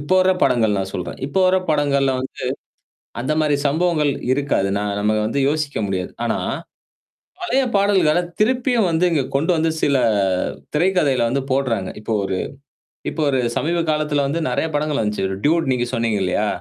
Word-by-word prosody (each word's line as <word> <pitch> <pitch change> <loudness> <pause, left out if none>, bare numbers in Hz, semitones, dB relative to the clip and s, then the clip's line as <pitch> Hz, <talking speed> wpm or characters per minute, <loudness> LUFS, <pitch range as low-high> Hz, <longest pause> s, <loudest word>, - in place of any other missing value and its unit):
இப்போ 145 +6 0
வர்ற 185 0 +4
படங்கள் 110 -5 +3
நான் 95 0 -3
சொல்றேன். 90 - -5
இப்ப 140 - -8
வர்ற 185 +1 +4
படங்கள்ல 140 -2 +2
வந்து 130 - -7 0.8
அந்தமாரி 155 +2 +1
சம்பவங்கள் 160 -1 +1 0.2
இருக்காது. 140 -8 0
நான் 100 -1 -2
நம்ம 105 +1 +2
வந்து 115 - -2
யோசிக்க 150 -1 -1
முடியாது. 95 -2 -3
ஆனா. - - 0 1.1
பழைய 270 -5 +2
பாடல்கள 195 -5 +3 0.2
திருப்பியும் 245 0 +2
வந்து, 165 +2 +2
இங்க 145 -5 +1
கொண்டு 160 +6 +2
வந்து, 160 0 +1
சில 140 -1 +2 0.8
திரைக்கதையில 150 -6 +2
வந்து 135 +3 0
போடுறாங்க. 125 -8 0
இப்போ 110 - -6
ஒரு, 95 -1 -2 0.7
இப்போ 160 - -3
ஒரு 135 - +1 0.2
சமீப 170 +2 0
காலத்துல 150 -2 0
வந்து, 160 +5 -1
நெறைய - - 0
படங்கள் 150 -1 0
வந்துச்சு. 105 -3 -1
ஒரு 95 - -4
டூட் 160 -1 +2
நீங்க 120 -1 0
சொன்னீங்க 115 -4 0
இல்லயா! 90 - 0
145 Hz, 160 wpm, -20 LUFS, 115-165 Hz, 1.1 s, வர்ற